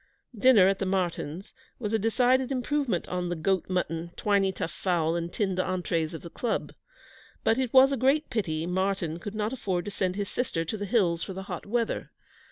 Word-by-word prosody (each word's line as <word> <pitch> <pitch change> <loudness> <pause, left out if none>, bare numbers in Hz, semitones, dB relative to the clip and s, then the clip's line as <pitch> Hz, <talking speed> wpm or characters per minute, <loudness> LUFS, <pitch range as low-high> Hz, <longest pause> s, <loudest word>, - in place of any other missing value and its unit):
Dinner 215 -4 +6
at 195 0 +1
the 195 - -1
Martyns' 180 -2 -2 0.2
was 215 -3 -3
a 220 - +3
decided 250 +4 +2
improvement 260 - 0
on 180 -1 -2
the 175 - -1
goat 185 +3 0
mutton, 170 -2 -1
twiney 200 -2 +2
tough 175 - -4
fowl, 170 -3 0
and 170 0 -3
tinned 190 -2 -1
entrees 175 -3 -1
of - - -8
the 170 - -9
Club. 235 -3 -2 0.7
But 225 +3 +3
it 255 -3 0
was 265 +1 +7
a 275 - 0
great 275 +5 +2
pity 165 -8 -1
Martyn 180 -2 -1
could 205 +4 -7
not 215 +2 -1
afford 185 -8 -2
to 205 - -4
send 185 -2 -1
his 205 0 -2
sister 175 -10 -2
to 165 - -3
the 205 -1 -4
Hills 180 -7 +2
for 190 - -4
the 190 +1 -6
hot 195 - -6
weather. 230 +1 -1
195 Hz, 200 wpm, -28 LUFS, 175-225 Hz, 0.7 s, was